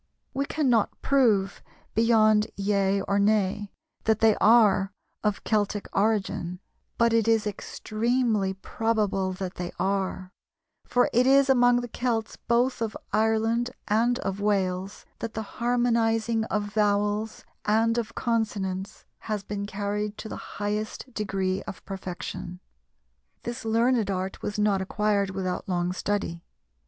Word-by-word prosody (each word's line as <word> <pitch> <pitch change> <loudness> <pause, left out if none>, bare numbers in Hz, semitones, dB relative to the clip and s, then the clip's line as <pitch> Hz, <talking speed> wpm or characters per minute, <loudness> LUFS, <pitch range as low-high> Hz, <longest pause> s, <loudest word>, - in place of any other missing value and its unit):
We 275 +1 0
cannot 250 -8 +1
prove 220 -8 +2 0.3
beyond 215 -2 +4
yea 200 -1 +1
or 200 +1 0
nay 205 -1 +1 0.3
that 220 -1 +3
they 220 -2 +5
are 210 -3 +5 0.3
of 210 -2 0
Celtic 205 -1 0
origin, 195 -4 0 0.4
but 235 0 +3
it 225 -1 +3
is 225 -1 +3
extremely 215 0 -1
probable 200 -2 0
that 185 -1 -5
they 175 -1 -4
are, 190 -1 -1 0.6
for 245 - +3
it 245 +2 +4
is 275 0 +5
among 245 -1 +4
the 245 - -5
Celts 230 -2 -2
both 240 +1 +1
of 220 -1 -2 0.2
Ireland 225 +2 +2 0.2
and 235 +3 +2
of 195 -4 -3
Wales 195 -2 -1
that 230 - -5
the 220 - -2 0.2
harmonizing 230 -2 +2
of 205 -2 -2
vowels 210 +1 0 0.2
and 225 +2 +3
of 230 0 -5
consonants 205 -4 -2
has 210 -2 -3
been 200 0 -4
carried 205 +1 -3
to - - -7
the - - -8
highest 210 +4 -3
degree 195 -3 -1
of - - -8
perfection. 180 -2 -6 0.8
This 235 0 -5
learned 230 -1 +2
art 190 0 -3
was 205 - -3
not 205 -2 +2
acquired 200 0 0
without 190 -1 -3
long 175 0 0
study. 190 -3 -2
210 Hz, 130 wpm, -26 LUFS, 195-230 Hz, 0.8 s, they